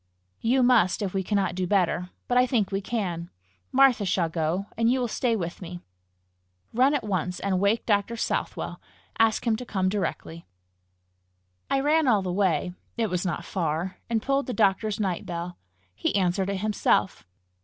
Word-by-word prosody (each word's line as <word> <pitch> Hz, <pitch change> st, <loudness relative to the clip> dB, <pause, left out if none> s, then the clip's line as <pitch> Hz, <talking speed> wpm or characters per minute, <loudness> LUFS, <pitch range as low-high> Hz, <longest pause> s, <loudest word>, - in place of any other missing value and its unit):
"You 250 Hz, +3 st, +2 dB
must, 225 Hz, -6 st, +4 dB
if 190 Hz, -, -3 dB
we 195 Hz, -, 0 dB
cannot 195 Hz, -1 st, 0 dB
do 180 Hz, 0 st, -2 dB
better. 180 Hz, -2 st, +1 dB, 0.2 s
But 245 Hz, -, 0 dB
I 250 Hz, -, +4 dB
think 225 Hz, -7 st, +1 dB
we 195 Hz, 0 st, -1 dB
can. 180 Hz, -6 st, -3 dB, 0.4 s
Martha 265 Hz, -5 st, +5 dB
shall 180 Hz, -3 st, +1 dB
go, 165 Hz, +4 st, -1 dB
and 230 Hz, +1 st, +2 dB
you 260 Hz, -, +2 dB
will 245 Hz, -, 0 dB
stay 235 Hz, +1 st, 0 dB
with 175 Hz, -3 st, -4 dB
me. 175 Hz, 0 st, -7 dB, 0.9 s
Run 260 Hz, +5 st, +4 dB
at 275 Hz, -, -1 dB
once 185 Hz, -3 st, -2 dB
and 195 Hz, -2 st, 0 dB
wake 200 Hz, +4 st, +1 dB
Dr. 205 Hz, +1 st, +1 dB
Southwell. 225 Hz, -, -3 dB, 0.4 s
Ask 225 Hz, +1 st, +3 dB
him 230 Hz, -2 st, +3 dB
to 250 Hz, -, -6 dB
come 190 Hz, -6 st, 0 dB
directly." 180 Hz, -4 st, -4 dB, 1.2 s
I 270 Hz, -, +2 dB
ran 305 Hz, +1 st, +3 dB
all 210 Hz, -6 st, +4 dB
the 180 Hz, -1 st, -2 dB
way 180 Hz, -3 st, +1 dB, 0.2 s
it 225 Hz, -4 st, 0 dB
was 180 Hz, +1 st, -1 dB
not 175 Hz, -, -3 dB
far 170 Hz, 0 st, -2 dB
and 225 Hz, -2 st, 0 dB
pulled 275 Hz, +1 st, 0 dB
the 250 Hz, -, -2 dB
doctor's 210 Hz, 0 st, +1 dB
night 190 Hz, -4 st, -1 dB
bell. 175 Hz, 0 st, -5 dB, 0.3 s
He 105 Hz, -, -1 dB
answered 190 Hz, 0 st, +1 dB
it 195 Hz, -1 st, -2 dB
himself. 210 Hz, -3 st, +1 dB
200 Hz, 175 wpm, -26 LUFS, 180-230 Hz, 1.2 s, Martha